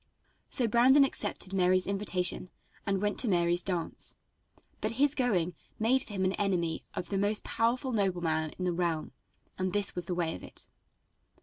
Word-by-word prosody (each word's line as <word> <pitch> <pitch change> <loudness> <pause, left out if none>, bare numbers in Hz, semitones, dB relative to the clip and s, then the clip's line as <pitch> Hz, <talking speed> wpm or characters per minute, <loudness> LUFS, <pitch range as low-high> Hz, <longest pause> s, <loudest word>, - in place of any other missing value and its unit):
So 245 -4 +1
Brandon 255 +5 +6
accepted 205 -7 -2
Mary's 185 -1 +3
invitation 185 -2 -1 0.4
and 195 -1 +1
went 205 0 +1
to 250 - +3
Mary's 175 -2 +2
dance, 175 -3 -1 0.6
but - - -2
his 280 +4 +2
going 195 - +1 0.2
made 245 +4 +3
for 215 - -7
him 190 -1 0
an 185 - +1
enemy 175 -5 0
of 180 - -4
the 195 - 0
most 205 +1 +1
powerful 250 +4 0
nobleman 175 -7 0
in 185 - -3
the 180 - +1
realm, 170 -2 -1 0.5
and 185 -1 -1
this 205 -2 +2
was 175 -1 0
the 180 - -2
way 170 -2 0
of - - -8
it. - - -7
190 Hz, 175 wpm, -30 LUFS, 175-220 Hz, 0.6 s, Brandon